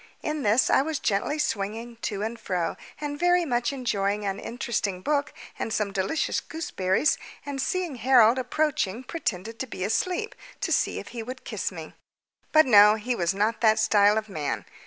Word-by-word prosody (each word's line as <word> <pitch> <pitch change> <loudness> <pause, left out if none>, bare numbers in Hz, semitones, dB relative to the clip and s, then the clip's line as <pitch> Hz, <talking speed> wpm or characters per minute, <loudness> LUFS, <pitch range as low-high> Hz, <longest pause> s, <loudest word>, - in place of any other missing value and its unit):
In 305 -1 -2
this 225 +2 +3
I - - +5
was 310 +2 -2
gently 210 +6 0
swinging 230 -3 -3
to 210 -3 -3
and 230 +2 -4
fro, 180 -6 -2 0.2
and 290 -1 -4
very 355 0 +3
much 240 -3 0
enjoying 210 -6 -1
an 195 0 -2
interesting 220 -6 -3
book 290 +4 0 0.3
and - - -3
some 210 -2 -1
delicious 195 +12 0
gooseberries, 275 - 0 0.3
and 280 -2 -3
seeing 350 -2 -2
Harold 240 0 +5
approaching 255 -5 -1
pretended 225 - -4
to 260 - -3
be 185 - -5
asleep, 365 - -1 0.3
to - - -1
see - - +1
if - - -7
he 235 - -6
would 255 +3 -8
kiss - - -3
me. - - -9 0.6
But 310 0 +6
no, 210 -3 +7
he 225 +3 -2
was 180 -4 0
not 215 +3 0
that 220 -1 +5
style 210 -1 +4
of 220 0 -2
man. 145 - -3
230 Hz, 180 wpm, -26 LUFS, 205-280 Hz, 0.6 s, no